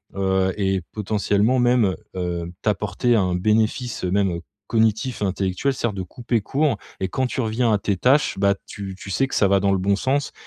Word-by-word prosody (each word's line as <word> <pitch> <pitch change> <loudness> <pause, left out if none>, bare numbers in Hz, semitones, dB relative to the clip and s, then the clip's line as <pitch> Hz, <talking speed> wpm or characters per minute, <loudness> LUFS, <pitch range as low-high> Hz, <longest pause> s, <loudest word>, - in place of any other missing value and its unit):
heu, 95 -1 +1
et 95 -2 0
potentiellement 105 +3 +1
même, 120 -6 +3 0.2
heu, 85 -2 -3
t'apporter 105 +3 +1
un 90 -3 +1
bénéfice, 110 +5 0
heu, - - 0
même, 100 -2 +2
heu, - - -8 0.3
cognitif 110 +2 +1
intellectuel. 100 +7 0
C'est-à-dire 120 -4 -2
de 95 - -3
couper 120 +5 -2
court 140 +3 0 0.2
et 95 - +1
quand 130 +5 0
tu 130 - -5
reviens 115 +1 +1
à - - +4
tes 100 -1 -1
tâches 130 -1 +2
bah, 100 0 +3
tu 95 -2 -7
tu 100 - -9
sais 135 +8 +1
que - - -5
ça 100 - +4
va 100 0 +4
dans 100 0 +2
le - - +2
bon 100 +2 +1
sens 140 +5 0
105 Hz, 200 wpm, -22 LUFS, 95-120 Hz, 0.3 s, à